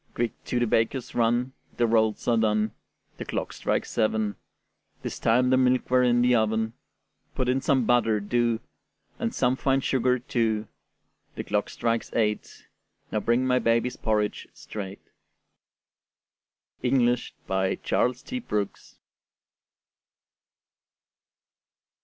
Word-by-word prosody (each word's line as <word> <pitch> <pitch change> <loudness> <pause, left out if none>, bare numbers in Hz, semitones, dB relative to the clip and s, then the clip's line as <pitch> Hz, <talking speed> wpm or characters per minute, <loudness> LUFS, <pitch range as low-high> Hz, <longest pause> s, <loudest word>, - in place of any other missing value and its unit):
Quick 120 -1 -2
to 125 - -1
the 120 - +2
baker's 115 +3 0
run; 120 +2 +1 0.2
The 120 - +3
rolls 110 -2 +1
are 120 - +4
done; 110 -1 +2 0.5
The - - -5
clock - - -3
strikes - - -1
seven: 110 -2 0 0.7
'Tis - - -5
time 125 +3 +3
the 130 - +5
milk 130 -1 +2
were 130 0 +5
in 120 -1 +3
the 125 0 +4
oven. 110 0 +1 0.6
Put 130 - -1
in 130 +1 +1
some 130 -3 +2
butter, 115 -2 +3
do, 115 +2 0 0.6
And - - -1
some 125 +1 +1
fine 135 0 +1
sugar, 125 -1 +2
too; 115 -3 -1 0.7
The - - -4
clock - - -1
strikes 115 -1 -1
eight: 105 -2 -1 0.4
Now 110 - +1
bring 120 +4 +1
my 125 0 +3
baby's 115 +1 +1
porridge 105 -2 -1
straight. 100 -2 -8 1.8
Englished 125 -1 +1
by 95 0 0
Charles 125 +1 0
T. 255 - -4
Brooks. 105 - -4
120 Hz, 125 wpm, -26 LUFS, 110-125 Hz, 1.8 s, the